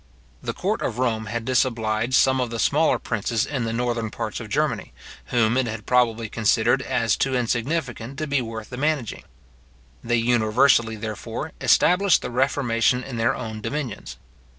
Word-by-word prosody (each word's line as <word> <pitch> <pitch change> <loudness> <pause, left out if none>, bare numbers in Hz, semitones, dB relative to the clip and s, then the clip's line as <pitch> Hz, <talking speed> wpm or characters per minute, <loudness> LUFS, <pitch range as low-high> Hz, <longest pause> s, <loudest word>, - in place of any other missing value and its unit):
The - - -4
court - - -1
of 115 - -2
Rome 115 -4 -1
had 115 +1 -4
disobliged 115 -2 +1
some 130 -1 +4
of 125 - -1
the 115 - -4
smaller 155 +7 +2
princes 115 0 -1
in 135 -5 -3
the 115 - -2
northern 120 -1 -1
parts - - -5
of - - -8
Germany, - - -1 0.3
whom 115 -1 +2
it 130 -2 +1
had 110 -2 -6
probably 115 -3 +2
considered 115 +4 +2
as 115 -4 0
too 135 -1 0
insignificant 125 +1 -2
to 155 - -2
be 140 -2 0
worth 110 -1 -7
the 125 - -6
managing. 145 -4 -1 0.8
They 120 +1 +1
universally, 115 0 +3
therefore, 110 -1 -5
established 190 +2 +4
the 125 - -4
reformation 125 -1 +1
in 130 -3 -6
their 115 +1 +1
own 110 -3 -6
dominions. 135 -4 -5
120 Hz, 165 wpm, -23 LUFS, 115-130 Hz, 0.8 s, some